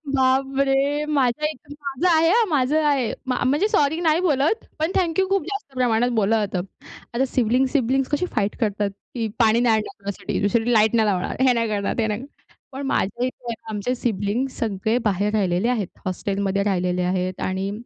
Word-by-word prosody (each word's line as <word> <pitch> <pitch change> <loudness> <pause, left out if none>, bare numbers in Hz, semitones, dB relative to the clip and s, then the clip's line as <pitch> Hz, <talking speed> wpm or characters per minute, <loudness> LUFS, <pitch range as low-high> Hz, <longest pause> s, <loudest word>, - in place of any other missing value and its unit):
बापरे! 270 +2 +2
माझ्या 295 -1 +1
इथे 290 -1 -10
माझं 285 +4 -1
आहे 325 +1 +4
हां, 455 +5 +4
माझं 295 +1 +2
आहे. 275 -5 +1
म 255 - +1 0.2
म्हणजे 295 +10 +2
सॉरी 320 -7 +2
नाही 320 -1 +3
बोलत. 315 - +1 0.2
पण 315 +3 0
थँक 340 -2 +1
यू 380 - +2
खूप 390 -3 +1
जास्त 400 -7 -6
प्रमाणात 245 -1 +2
बोललं 215 +1 +2
जातं. 190 -2 -3 0.5
आता 255 +3 +1
सिबलिंग-सिबलिंग 260 +2 +1
कशी 300 +5 +1
फाईट 210 -2 0
करतात? 205 -2 0 0.3
की 230 -2 -1
पाणी 225 0 +4
नाही 235 -2 +3
आणणार 215 -1 -4
तुझ्यासाठी, 200 0 -4
तुझ्यासाठी 225 +3 +1
लाईट 220 0 +4
नाही 220 -2 +3
लावणार, 185 -3 -1
हे 260 -1 +5
नाही 230 -1 0
करणार, 205 -1 -1
ते 225 -2 +1
नाही 210 0 -2
करणार. 275 - -14 0.3
पण 275 +1 -5
माझ्या 240 -1 0
इथे 245 -2 -5 0.2
आमचे 215 +3 -2
सिबलिंग्स 235 +3 -2
सगळे 220 +1 0
बाहेर 205 +1 +1
राहिलेले 195 +1 +1
आहेत. 220 -7 0 0.2
हॉस्टेलमध्ये 195 +1 -1
राहिलेले 180 -2 0
आहेत 185 0 -2
आणि 190 +1 -2
245 Hz, 180 wpm, -22 LUFS, 205-280 Hz, 0.5 s, हे